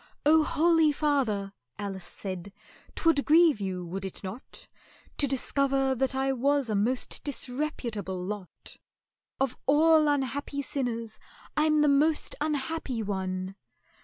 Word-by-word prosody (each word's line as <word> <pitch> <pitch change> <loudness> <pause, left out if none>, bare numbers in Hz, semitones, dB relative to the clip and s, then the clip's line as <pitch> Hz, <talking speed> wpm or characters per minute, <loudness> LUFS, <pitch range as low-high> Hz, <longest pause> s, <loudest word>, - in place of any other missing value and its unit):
"Oh, 315 +2 +6
holy 325 0 +3
father," 255 -10 0 0.2
ALICE 195 -3 -5
said, 185 +1 -6 0.4
"'t - - -3
would 320 -4 +4
grieve 315 -6 +5
you, 185 -2 -3
would 190 +3 -5
it 190 +1 -6
not, 195 +7 -6 0.5
To 285 - +5
discover 270 0 +1
that 265 +1 0
I 270 0 +1
was 275 -1 +1
a - - +1
most 240 +6 0
disreputable 245 -9 -3
lot? 190 0 -7 0.6
Of 265 -2 0
all 310 +2 +5
unhappy 280 0 -1
sinners 230 -5 -3 0.4
I'm 305 0 +3
the 300 - +4
most 295 +3 +2
unhappy 295 -4 -2
one!" 190 -1 -3
265 Hz, 130 wpm, -28 LUFS, 205-295 Hz, 0.6 s, Oh